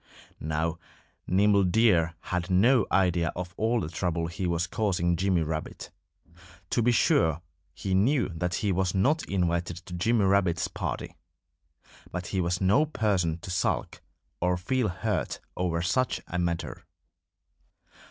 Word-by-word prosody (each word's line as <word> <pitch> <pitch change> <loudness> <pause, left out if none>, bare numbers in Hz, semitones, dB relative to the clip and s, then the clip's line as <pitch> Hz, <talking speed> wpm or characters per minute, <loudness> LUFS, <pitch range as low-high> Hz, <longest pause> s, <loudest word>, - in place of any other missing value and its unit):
Now, 80 +2 -2 0.5
Nimble 100 +2 +4
Deer 90 -4 +3
had 90 0 -3
no 110 +5 +4
idea 90 -3 +2
of 90 0 -5
all 115 +1 +1
the 80 - -3
trouble 85 -1 -2
he 90 +3 -3
was 85 0 0
causing 85 -2 0
Jimmy 90 -1 +1
Rabbit. 80 0 -5 0.8
To 120 - +2
be 120 +2 +3
sure, 85 -7 +2 0.3
he 95 - -3
knew 120 +8 +2
that 90 +1 -2
he 105 - 0
was 95 0 0
not 145 +12 +2
invited 85 -2 0
to 90 - -9
Jimmy 105 +4 +2
Rabbit's 95 -4 +2
party. - - -5 1.0
But 90 0 -4
he 95 +1 -1
was 90 +1 -1
no 105 +11 +3
person 95 - 0
to 90 - -7
sulk 90 - -1 0.4
or 90 +1 +1
feel 120 +7 0
hurt 90 - -2 0.2
over 85 -2 -1
such 125 +8 0
a 90 - -3
matter. 85 -1 -3
90 Hz, 140 wpm, -27 LUFS, 85-100 Hz, 1.0 s, Nimble